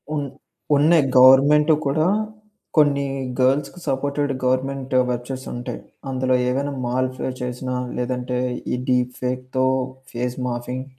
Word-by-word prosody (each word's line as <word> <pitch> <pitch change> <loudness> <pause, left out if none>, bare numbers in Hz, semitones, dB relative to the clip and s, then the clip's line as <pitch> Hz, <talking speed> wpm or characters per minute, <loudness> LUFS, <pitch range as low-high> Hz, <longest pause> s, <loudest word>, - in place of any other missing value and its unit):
ఉన్ 145 -2 -2 0.5
ఉన్నాయి. 155 +2 +5
గవర్నమెంటు 145 +4 +7
కూడా 155 +4 +2 0.7
కొన్ని 145 -2 +4 0.3
గర్ల్స్‌కి 140 +6 +1
సపోర్టెడ్ 140 +1 -1
గవర్నమెంట్ 130 +1 -1 0.2
వెబ్‌సైట్స్ 125 +2 -5
ఉంటాయి. 120 0 -5 0.3
అందులో 130 0 0 0.2
ఏవైనా 140 +3 -1
మాల్ఫ్ 130 +1 -1 0.2
చేసినా 125 +1 -3 0.2
లేదంటే 125 0 -2 0.4
ఈ - - +2
డీప్ 125 0 +1
ఫేక్‌తో 130 +1 -1 0.5
ఫేస్ 125 +1 -3
మాఫింగ్ 125 +1 -4
130 Hz, 110 wpm, -22 LUFS, 125-140 Hz, 0.7 s, గవర్నమెంటు